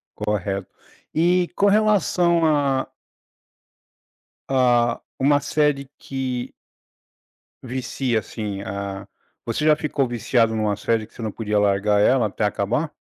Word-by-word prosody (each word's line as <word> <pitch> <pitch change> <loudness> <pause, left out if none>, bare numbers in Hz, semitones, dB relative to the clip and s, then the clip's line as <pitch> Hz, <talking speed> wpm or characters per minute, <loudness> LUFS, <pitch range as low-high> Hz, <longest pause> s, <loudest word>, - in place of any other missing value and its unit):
Correto. 100 -2 -2 0.5
E 175 +2 +2
com 200 - +3
relação 190 -5 +3
a 140 -3 +1 1.6
a 120 -3 +2 0.2
uma 145 +2 +4
série 145 -2 0
que 130 -2 -4 1.1
vicia 125 -1 -2
assim 105 -1 -5
a 100 0 -5 0.4
você 120 +6 -2
já 155 - +6
ficou 150 -4 -1
viciado 115 -1 +1
em 110 - -1
uma 105 -1 0
série 110 +1 0
que - - -26
você - - -10
não 110 -2 -3
podia 105 -1 -1
largar 105 +1 +2
ela 125 0 +4
até 105 +1 -2
acabar? 120 +10 -1
120 Hz, 125 wpm, -22 LUFS, 105-145 Hz, 1.6 s, já